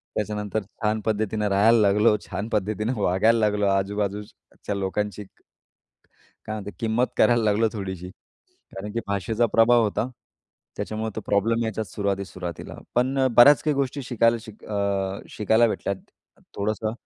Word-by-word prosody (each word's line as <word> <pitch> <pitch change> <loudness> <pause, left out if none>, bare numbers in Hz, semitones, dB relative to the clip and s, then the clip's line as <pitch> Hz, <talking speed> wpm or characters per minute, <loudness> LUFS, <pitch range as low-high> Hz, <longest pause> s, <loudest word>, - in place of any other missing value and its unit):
त्याच्यानंतर 105 0 -2 0.2
छान 105 0 +1
पद्धतीने 105 -1 0
राहायला 105 +4 +5
लागलो 105 +2 +4
छान 105 +3 -5
पद्धतीने 105 +3 -1
वागायला 110 +6 +3
लागलो 105 -1 +1
आजूबाजूच 100 +1 -1 0.3
च्या 105 - -2
लोकांशी 105 +1 -2 1.2
काय 110 - -3
म्हणतो? 105 -1 -6
किंमत 115 +2 +1
करायला 120 -1 +4
लागलो 110 +2 +3
थोडीशी. 95 -4 -5 0.7
कारण 105 +2 -6
की 115 - -1
भाषेचा 105 +4 0
प्रभाव 115 +2 +4
होता, 105 +2 0 0.7
त्याच्यामुळे 110 +1 -3
तो - - -2
प्रॉब्लेम 115 +3 +1
यायचाच 110 -3 -4
सुरुवातीत 100 -1 -1
सुरुवातीला. 90 -3 -7 0.2
पण 130 +3 +1 0.2
बऱ्याच 140 +4 +8
काही 150 -2 +1
गोष्टी 140 0 -2
शिकायला 115 -1 +2
शिक 110 -2 -13
अ, 100 -2 -1
शिकायला 110 +2 +3
भेटल्यात 100 -2 -2 0.6
थोडंसं 110 +1 -1
105 Hz, 135 wpm, -24 LUFS, 100-115 Hz, 1.2 s, बऱ्याच